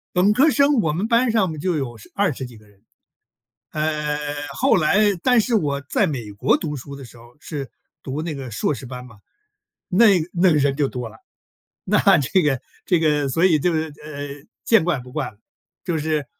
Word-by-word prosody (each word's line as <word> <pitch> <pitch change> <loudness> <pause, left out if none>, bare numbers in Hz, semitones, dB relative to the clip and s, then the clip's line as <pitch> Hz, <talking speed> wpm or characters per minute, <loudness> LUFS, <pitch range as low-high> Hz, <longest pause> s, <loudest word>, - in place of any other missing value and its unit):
本 180 +3 +4
科 280 +7 +5
生 285 0 +3
我 155 - 0
们 185 +8 -2
班 235 0 +3
上 215 -4 +2
面 155 - -7
就 180 +4 -1
有 130 -5 -4
10 105 - -16
20 185 -10 0
几 120 -3 -11
个 105 -1 -21
人。 100 -1 -26 0.9
呃， 150 -1 -1 0.4
后 270 +3 +4
来 175 +3 +2 0.2
但 250 -2 +4
是 235 +2 -1
我 145 -9 0
在 140 - 0
美 120 -8 -4
国 100 - +2
读 150 -2 -4
书 140 +2 -9
的 140 - -10
时 120 - -14
候 120 +1 -17
是 145 -6 -6 0.3
读 140 +2 -4
那 160 -1 -4
个 135 -3 -7
硕 110 +7 -1
士 130 - -9
班 125 0 -8
嘛， 115 -4 -16 0.7
那 205 +6 +5 0.3
那 180 +1 +3
个 - - +3
人 140 -1 +1
就 145 -2 +2
多 125 -3 -6
了， 110 - -16 0.7
那 210 +3 +2 0.2
这 155 +6 +2
个， 140 -5 0 0.2
这 180 -3 +2
个 150 -3 +2
所 150 +6 0
以 170 -5 +4
就 175 +4 +1
是， 160 -1 -2
呃， 145 -1 -8 0.2
见 225 -8 +4
怪 170 -6 0
不 125 0 -12
怪 150 +1 -3
了， 100 - -22 0.5
就 175 -3 -2
是 155 -1 -1
150 Hz, 215 characters per minute, -21 LUFS, 135-180 Hz, 0.9 s, 科